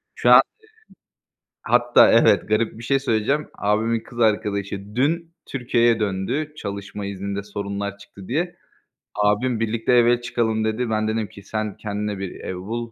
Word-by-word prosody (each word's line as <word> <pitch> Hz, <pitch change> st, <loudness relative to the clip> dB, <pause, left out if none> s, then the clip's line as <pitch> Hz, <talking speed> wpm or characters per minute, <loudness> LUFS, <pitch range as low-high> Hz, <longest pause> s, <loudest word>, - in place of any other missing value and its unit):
Şu -, -, +1 dB
an -, -, +10 dB
eee, -, -, +10 dB, 1.2 s
hatta 120 Hz, +1 st, +5 dB
evet 105 Hz, -5 st, +4 dB
garip 110 Hz, +1 st, 0 dB
bir -, -, -9 dB
şey 135 Hz, +3 st, +2 dB
söyleyeceğim. 135 Hz, +3 st, 0 dB
Abimin 110 Hz, +3 st, +1 dB
kız 120 Hz, +1 st, -10 dB
arkadaşı 100 Hz, -2 st, -1 dB
dün 165 Hz, +6 st, 0 dB
Türkiye'ye 120 Hz, -3 st, +1 dB
döndü, 105 Hz, +10 st, -2 dB
çalışma 100 Hz, -2 st, -6 dB
izninde 100 Hz, 0 st, -4 dB
sorunlar 100 Hz, 0 st, -5 dB
çıktı 100 Hz, -2 st, -14 dB
diye. 175 Hz, +7 st, -2 dB, 0.6 s
Abim: 105 Hz, +4 st, +1 dB
"Birlikte 115 Hz, +2 st, 0 dB
eve 120 Hz, 0 st, +4 dB
çıkalım." 110 Hz, -2 st, -1 dB
dedi. 110 Hz, +2 st, -1 dB
Ben 110 Hz, 0 st, 0 dB
dedim 110 Hz, -1 st, -1 dB
ki: 100 Hz, -, -14 dB
"Sen 110 Hz, 0 st, -4 dB
kendine 105 Hz, -1 st, -3 dB
bir 95 Hz, -2 st, -5 dB
ev 95 Hz, -, -5 dB
bul, 115 Hz, +6 st, -5 dB
110 Hz, 155 wpm, -22 LUFS, 100-120 Hz, 1.2 s, an